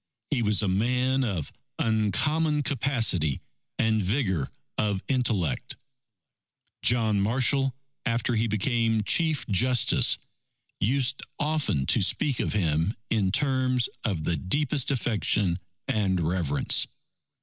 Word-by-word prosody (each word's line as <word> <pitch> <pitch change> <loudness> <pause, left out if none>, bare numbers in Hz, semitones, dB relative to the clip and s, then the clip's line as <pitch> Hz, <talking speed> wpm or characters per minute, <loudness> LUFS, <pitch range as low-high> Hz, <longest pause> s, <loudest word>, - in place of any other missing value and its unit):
He 135 -5 +1
was 105 -1 +2
a - - +1
man 125 +7 +1
of 95 - -3 0.3
uncommon 150 - +1
capacity 115 - 0 0.4
and 110 -1 +2
vigour 95 - 0 0.3
of 100 -3 -1
intellect. 115 - -1 1.1
John 110 -4 +3
Marshall, 130 +4 +1 0.3
after 115 +1 0
he 115 +1 +1
became 115 +1 +1
Chief 160 - +1
Justice, 120 +5 +2 0.6
used 130 +4 +1 0.2
often 150 - 0
to - - +2
speak 140 -5 +1
of - - -1
him 85 0 +1 0.2
in 100 -4 +2
terms 130 -1 +1
of 95 -9 -1
the 85 0 0
deepest 145 +7 0
affection 105 -8 +1 0.3
and 95 -4 +1
reverence. 80 -3 +1
110 Hz, 110 wpm, -26 LUFS, 95-130 Hz, 1.1 s, John